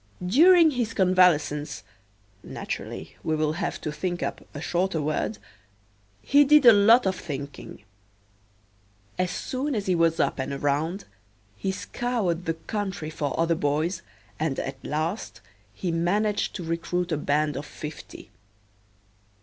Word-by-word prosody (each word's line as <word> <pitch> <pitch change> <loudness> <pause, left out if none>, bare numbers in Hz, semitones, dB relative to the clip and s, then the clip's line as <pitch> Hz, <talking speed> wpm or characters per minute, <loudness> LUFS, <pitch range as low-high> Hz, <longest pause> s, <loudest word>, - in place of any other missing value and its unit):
During 330 - +6
his 240 -4 -2
convalescence 180 -6 +2 0.6
(naturally - - -6
we 155 - 0
will 155 0 0
have 165 - -3
to 150 - -3
think 175 +3 -3
up - - -4
a 145 - -7
shorter 175 +2 -1
word) 145 -8 -1 0.9
he 285 +1 +5
did 295 -1 +5
a 235 - +10
lot 220 +4 +6
of 190 -1 +1
thinking. 140 - -7 1.4
As 185 0 +1
soon 265 +8 -3
as 205 -2 -2
he 185 - +2
was 165 -1 +2
up - - +1
and 130 +1 -3
around 145 +7 -1 0.5
he 190 - -2
scoured 190 -5 -2
the 165 - -1
country 190 -2 -4
for 145 -2 -3
other 165 0 +3
boys 160 +3 -1 0.4
and 155 -3 -1
at 135 - -5
last 160 +8 -3 0.3
he 175 - -3
managed 200 +6 0
to 185 - -5
recruit 170 +2 -2
a - - +2
band 150 +1 0
of 140 +2 -5
fifty. 150 0 -9
170 Hz, 140 wpm, -26 LUFS, 155-200 Hz, 1.4 s, a